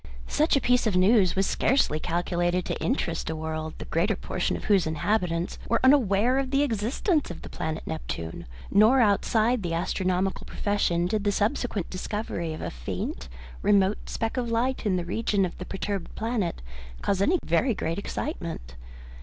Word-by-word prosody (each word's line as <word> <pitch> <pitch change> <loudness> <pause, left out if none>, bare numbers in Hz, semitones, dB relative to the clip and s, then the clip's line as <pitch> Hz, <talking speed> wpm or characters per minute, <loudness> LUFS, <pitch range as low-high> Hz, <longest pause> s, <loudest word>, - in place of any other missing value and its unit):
Such 310 +1 +2
a - - +4
piece 245 -1 +3
of 205 - 0
news 190 0 +4
was 195 0 +2
scarcely 225 - +2
calculated 175 +1 0
to - - -3
interest 170 -12 -1
a 160 - -2
world 155 0 -4
the - - -7
greater 195 +6 +1
portion 180 - -2
of - - -9
whose 195 -6 +3
inhabitants 170 +1 -1
were 230 - +3
unaware 250 -2 +4
of 270 -1 -2
the 275 +1 +2
existence 275 - 0
of 175 - -8
the - - -8
planet 160 0 -4
Neptune, 80 +3 -5 0.2
nor 220 +6 +6
outside 220 +2 +3
the 170 -3 -2
astronomical 185 +2 -1
profession 180 -4 0
did 205 +3 0
the 205 - +2
subsequent 210 - -1
discovery 185 -3 -3
of 155 - -6
a - - -3
faint - - -5 0.3
remote 200 0 +2
speck 225 +3 -2
of 245 -2 -1
light 235 +1 0
in 190 - +2
the 175 -1 -2
region 200 +1 +1
of 175 - -5
the 180 - -5
perturbed 195 -1 -4
planet 220 - -2 0.4
cause 195 -1 +1
any 340 - +4
very 210 +9 +2
great 165 0 -2
excitement. 170 - -5
195 Hz, 170 wpm, -26 LUFS, 170-230 Hz, 0.4 s, nor